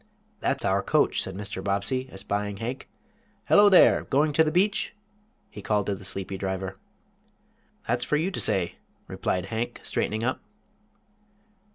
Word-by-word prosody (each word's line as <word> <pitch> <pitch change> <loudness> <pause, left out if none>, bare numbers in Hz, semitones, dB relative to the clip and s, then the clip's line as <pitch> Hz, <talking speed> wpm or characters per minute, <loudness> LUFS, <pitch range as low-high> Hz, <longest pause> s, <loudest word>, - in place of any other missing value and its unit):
"That's - - 0
our - - +2
coach," - - +2
said - - -4
Mr. 100 -1 -6
Bobbsey, 100 +7 -1
espying 100 +1 -3
Hank. 120 +5 -5 0.6
"Hello 205 0 +6
there! 190 - +6
Going 145 +2 +2
to 160 - +5
the 155 - +1
beach?" 195 +6 +1 0.6
he 105 - -9
called 105 -1 0
to 100 - -1
the 95 - -8
sleepy 95 0 -4
driver. 95 -1 -3 1.1
"That's 120 +1 0
for 150 - +1
you 170 +5 0
to - - -4
say," 90 -3 0 0.3
replied 90 -1 -2
Hank, 115 +2 -3
straightening 110 +2 -2
up. 130 +2 -1
105 Hz, 150 wpm, -26 LUFS, 95-140 Hz, 1.1 s, Hello